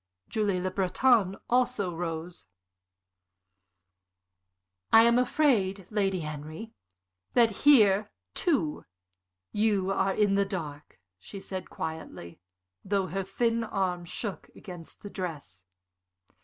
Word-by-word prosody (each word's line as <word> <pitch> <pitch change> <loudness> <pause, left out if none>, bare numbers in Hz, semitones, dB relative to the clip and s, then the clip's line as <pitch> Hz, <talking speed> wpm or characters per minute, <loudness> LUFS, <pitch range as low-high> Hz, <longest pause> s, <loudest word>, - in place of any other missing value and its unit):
Julie 205 -4 0
Le 185 +1 -2
Breton 195 +1 +2
also 230 -7 +1
rose. 165 0 -5 2.4
"I 225 - +8
am 235 +1 +5
afraid, 235 - +2
Lady 195 -4 0
Henry, 155 +8 -7 0.6
that 235 -2 +5
here, 210 -5 +5 0.2
too, 250 - 0 0.7
you 205 -3 +1
are 195 0 +1
in 205 -2 +3
the 200 0 +3
dark," 155 - -7 0.2
she 195 - -9
said, 190 -1 -6
quietly, 160 - -7 0.4
though 195 -1 0
her 190 +3 -3
thin 230 +4 0
arm 185 -5 -2
shook 200 +3 -5
against 175 -4 -11
her 205 - -6
dress. 155 - -6
195 Hz, 105 wpm, -28 LUFS, 175-220 Hz, 2.4 s, I